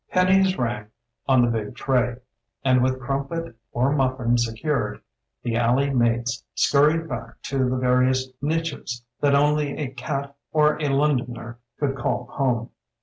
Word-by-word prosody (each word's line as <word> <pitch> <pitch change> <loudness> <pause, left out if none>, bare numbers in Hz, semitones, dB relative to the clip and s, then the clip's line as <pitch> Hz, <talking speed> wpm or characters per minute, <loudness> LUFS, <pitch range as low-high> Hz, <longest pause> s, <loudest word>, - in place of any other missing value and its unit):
Pennies 185 +1 +3
rang 115 -4 -2 0.4
on 130 -3 +5
the 120 - +1
big 110 0 -3
tray, 125 -3 +1 0.5
and 130 -1 +4
with 130 +1 +1
crumpet 140 +3 -3 0.2
or 125 +3 +1
muffin 130 -4 +1
secured 115 -1 -1 0.4
the 115 -2 -1
alley 125 +4 +2
mates 120 -1 +1
scurried 155 +3 +3
back 115 -6 -6
to 130 -2 0
the 130 - 0
vari 125 0 +3
ous 130 0 0
niches, 165 +2 0
niches 120 -1 -6
that 140 -1 +3
only 145 0 +2
a 140 -4 -3
cat 140 +1 -4 0.2
or 150 0 +3
a 150 - +1
Londoner 125 -5 0 0.2
could 140 -2 0
call 135 +1 -1
home. 125 -5 0
130 Hz, 150 wpm, -24 LUFS, 120-145 Hz, 0.5 s, on